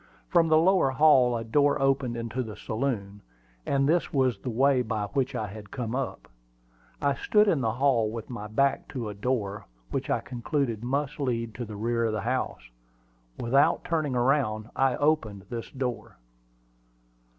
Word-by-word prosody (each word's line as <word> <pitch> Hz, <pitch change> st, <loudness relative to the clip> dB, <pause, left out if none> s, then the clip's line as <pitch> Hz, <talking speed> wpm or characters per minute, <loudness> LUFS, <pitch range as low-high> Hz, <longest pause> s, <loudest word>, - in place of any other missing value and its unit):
From 170 Hz, -2 st, +4 dB
the 155 Hz, -1 st, +5 dB
lower 180 Hz, -3 st, +4 dB
hall 130 Hz, -4 st, +5 dB
a 115 Hz, -, -4 dB
door 145 Hz, +5 st, +2 dB
opened 135 Hz, -3 st, +1 dB
into 115 Hz, +2 st, -3 dB
the 110 Hz, -4 st, -6 dB
saloon; 110 Hz, -4 st, -3 dB, 0.5 s
and 135 Hz, 0 st, +2 dB
this 170 Hz, +3 st, +1 dB
was 130 Hz, -6 st, +1 dB
the 125 Hz, -, -5 dB
way 130 Hz, +2 st, +3 dB
by 110 Hz, -3 st, -2 dB
which 130 Hz, +5 st, -1 dB
I 110 Hz, -, -2 dB
had 105 Hz, 0 st, -9 dB
come 120 Hz, -2 st, -4 dB
up. 135 Hz, 0 st, -4 dB, 0.7 s
I 140 Hz, 0 st, +2 dB
stood 210 Hz, +9 st, +3 dB
in 160 Hz, -8 st, +2 dB
the 110 Hz, -3 st, 0 dB
hall 120 Hz, -4 st, +2 dB
with 115 Hz, 0 st, -6 dB
my 105 Hz, -4 st, -6 dB
back 135 Hz, +6 st, +1 dB
to 120 Hz, -6 st, -3 dB
a -, -, -5 dB
door, 105 Hz, -2 st, -2 dB, 0.2 s
which -, -, -3 dB
I -, -, +2 dB
concluded 120 Hz, -1 st, -2 dB
must 140 Hz, +4 st, -2 dB
lead 115 Hz, -5 st, -1 dB
to 120 Hz, +1 st, -5 dB
the 105 Hz, -1 st, -8 dB
rear 115 Hz, +2 st, 0 dB
of 110 Hz, -, 0 dB
the 110 Hz, -, -2 dB
house. 115 Hz, -, -2 dB, 0.7 s
Without 135 Hz, +4 st, +3 dB
turning 155 Hz, -6 st, -1 dB
around, 120 Hz, -4 st, +1 dB
I 135 Hz, -2 st, +2 dB
opened 125 Hz, -10 st, 0 dB
this 115 Hz, -1 st, -5 dB
door. 130 Hz, -3 st, -4 dB
125 Hz, 175 wpm, -27 LUFS, 110-140 Hz, 0.7 s, the